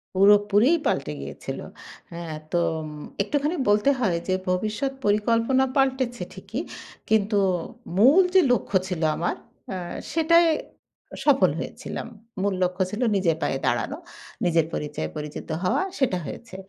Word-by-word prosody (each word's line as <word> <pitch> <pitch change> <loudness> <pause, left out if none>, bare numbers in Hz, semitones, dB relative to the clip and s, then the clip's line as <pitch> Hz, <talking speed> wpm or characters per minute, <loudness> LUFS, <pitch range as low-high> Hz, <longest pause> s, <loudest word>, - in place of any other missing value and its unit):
পুরোপুরিই 205 - +5
পাল্টে - - 0
গিয়েছিল। - - -6 0.5
হ্যাঁ 170 -2 -6 0.2
তো 175 - +1 0.2
উম 155 - -6 0.3
একটুখানি 295 - -1
বলতে 210 +6 +4
হয় 190 -9 +1
যে 185 - +1 0.2
ভবিষ্যৎ 215 +8 -1
পরিকল্পনা 230 +5 +2
পাল্টেছে 260 -3 +1
ঠিকই, - - -5 0.5
কিন্তু 210 -1 +2 0.6
মূল 275 - +7
যে 375 - +8
লক্ষ্য 220 -4 0
ছিল 180 -3 -3
আমার, 175 - -1 0.4
আ - - -3 0.4
সেটাই 335 +1 +5 0.7
আ - - -5
সফল 280 -2 +5
হয়েছিলাম। - - -6 0.3
মূল 200 0 +1
লক্ষ্য 180 +1 -1
ছিল 215 +4 -4
নিজের 175 -5 +2
পায়ে 135 - 0
দাঁড়ানো। - - 0 0.5
নিজের 165 -2 +3
পরিচয়ে 145 - -3
পরিচিত 150 0 -6 0.2
হওয়া 180 - +2 0.2
সেটা 255 -9 +2
হয়েছে। 230 +6 -8
210 Hz, 135 wpm, -25 LUFS, 180-265 Hz, 0.7 s, যে